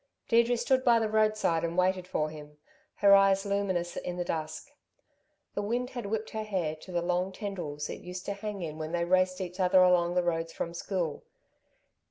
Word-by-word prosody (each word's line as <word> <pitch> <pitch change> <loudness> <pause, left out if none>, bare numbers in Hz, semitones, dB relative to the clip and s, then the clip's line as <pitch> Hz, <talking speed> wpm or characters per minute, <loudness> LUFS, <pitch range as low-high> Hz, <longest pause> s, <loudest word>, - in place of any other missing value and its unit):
Deirdre 235 +1 +4
stood 255 +2 +2
by 240 -2 +5
the 225 -1 +1
roadside 215 -6 +2
and 170 +1 -2
waited 185 0 +1
for 155 -4 -1
him, 150 -1 -11 0.4
her 200 -1 +6
eyes 195 0 +4
luminous 195 -4 -1
in 180 0 -4
the 175 - -2
dusk. 160 - -4 0.8
The - - -2
wind 240 +5 -2
had 245 -5 -5
whipped 220 +1 -3
her 220 - -3
hair 185 -7 -2
to 185 - -12
the 175 -1 -1
long 180 +2 0
tendrils 180 -8 -5
it - - -7
used 180 +1 -7
to 200 - -2
hang 200 -1 -5
in 155 -1 -6
when 155 +1 -5
they 170 0 +1
raced 185 +1 +2
each 180 0 -6
other 185 0 +5
along 175 -1 +3
the 180 - +3
roads 165 -1 -1
from 170 - -4
school. 175 -3 -3
185 Hz, 200 wpm, -29 LUFS, 170-205 Hz, 0.8 s, her